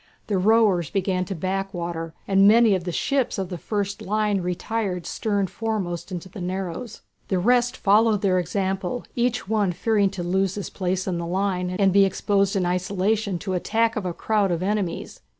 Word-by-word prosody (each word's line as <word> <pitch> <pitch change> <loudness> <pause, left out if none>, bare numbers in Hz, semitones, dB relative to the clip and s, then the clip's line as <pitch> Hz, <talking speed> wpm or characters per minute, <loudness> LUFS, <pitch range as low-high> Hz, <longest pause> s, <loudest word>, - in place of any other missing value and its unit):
The 200 -3 0
rowers 200 -5 +3
began 185 -1 0
to 195 - -5
backwater, 175 -2 -3
and 195 0 +5
many 225 0 +6
of 185 -2 -1
the 175 - -2
ships 265 +7 0
of 190 -2 -3
the 180 - -4
first 200 0 -3
line 210 -1 0
retired 180 +1 -2
stern 205 -3 -1
foremost 195 -4 -3
into 180 0 -5
the 185 +1 -9
narrows. 185 +4 -4 0.3
The 190 - 0
rest 245 +6 +2
followed 210 +1 +3
their 185 -2 +3
example, 195 +4 -2
each 240 -3 0
one 210 -3 +1
fearing 200 +2 +1
to 175 - -2
lose 190 +2 0
his 205 - -5
place 185 -1 -2
in 180 -3 -2
the 170 - -4
line, 185 0 -1
and 195 -2 +3
be 200 0 +6
exposed 195 +1 +1
in 190 -2 +1
isolation 190 +3 0
to 190 +3 -5
the 185 - +1
attack 225 +5 +1
of 205 -4 -2
a - - -1
crowd 205 +3 0
of 170 +1 -1
enemies. 200 -3 -2
195 Hz, 185 wpm, -24 LUFS, 180-210 Hz, 0.3 s, many